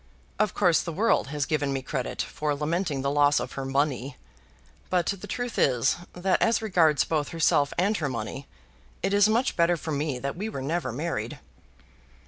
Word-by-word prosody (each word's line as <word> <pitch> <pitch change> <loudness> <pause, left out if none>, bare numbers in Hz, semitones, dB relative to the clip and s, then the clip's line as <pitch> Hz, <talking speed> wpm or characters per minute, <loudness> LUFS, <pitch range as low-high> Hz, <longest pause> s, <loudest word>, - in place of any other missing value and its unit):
Of 215 -2 +1
course 175 -5 +4
the 170 - -5
world 205 -2 +2
has 145 0 -2
given 145 -3 0
me 135 -1 -2
credit - - -3
for 150 -1 -2
lamenting 150 -1 -1
the 140 - +1
loss 145 0 +4
of - - -5
her 135 - -5
money. 135 0 -1 0.7
But 180 -2 +2
the 200 -2 -3
truth 245 -1 -3
is, 125 -1 +3 0.2
that 185 +1 0
as 230 -1 +3
regards 170 -9 +3
both 150 -3 -1
herself 160 -4 +2
and 200 +5 +2
her 145 -3 -1
money, 120 +3 -5 0.6
it 195 - +1
is 205 +1 +5
much 235 +4 +1
better 170 0 +3
for 160 0 -5
me 145 -2 -1
that 140 +2 -4
we 205 +5 -4
were 135 -11 -5
never 165 +2 -1
married." 120 -4 -3
155 Hz, 185 wpm, -26 LUFS, 140-180 Hz, 0.7 s, is